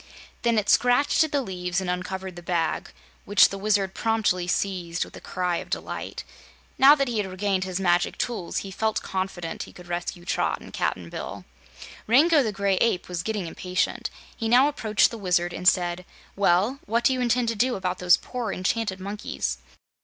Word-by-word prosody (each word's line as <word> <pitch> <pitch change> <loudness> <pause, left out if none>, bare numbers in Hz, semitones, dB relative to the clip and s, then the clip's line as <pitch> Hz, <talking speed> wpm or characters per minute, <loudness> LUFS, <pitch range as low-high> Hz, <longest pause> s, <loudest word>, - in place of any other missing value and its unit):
Then 235 -1 +2
it 210 - +1
scratched 250 +6 +4
at 315 - -3
the 285 -2 +1
leaves 180 -3 -2
and 190 - -4
uncovered 180 +1 -4
the 175 - -9
bag, 170 -2 -1 0.3
which 205 - +5
the 195 - -5
Wizard 200 -2 +1
promptly 215 -6 0
seized 180 -2 -1
with - - -14
a - - -10
cry 180 -1 -1
of - - -7
delight. - - -4 0.6
Now 275 +2 +9
that 275 -2 0
he 235 -2 -2
had 205 - -1
regained 190 0 -1
his 185 0 -3
Magic 175 -1 +1
Tools, 225 -8 -3
he 195 - -7
felt 220 +2 -1
confident 185 -3 -4
he - - -7
could 180 - -13
rescue 175 0 -4
Trot - - 0
and - - -13
Cap'n - - -2
Bill. - - -6 0.6
Rango 295 +7 +5
the 225 -5 -1
Gray 200 -1 0
Ape 225 -5 +1
was 180 -2 -3
getting 210 0 -3
impatient. 180 +2 -2 0.3
He 225 - -3
now 250 +4 +6
approached 225 -6 +2
the 230 - -7
Wizard 175 -2 +1
and 180 - -3
said: 180 -2 +3 0.3
"Well, 200 +7 +2
what 230 +3 +1
do 260 - +4
you 255 - -2
intend 245 -1 +2
to 230 - -1
do 245 +4 +1
about 185 -1 -3
those 180 0 +5
poor 245 -5 -4
enchanted 195 +1 -1
monkeys?" 185 - -4
195 Hz, 190 wpm, -25 LUFS, 180-230 Hz, 0.6 s, Now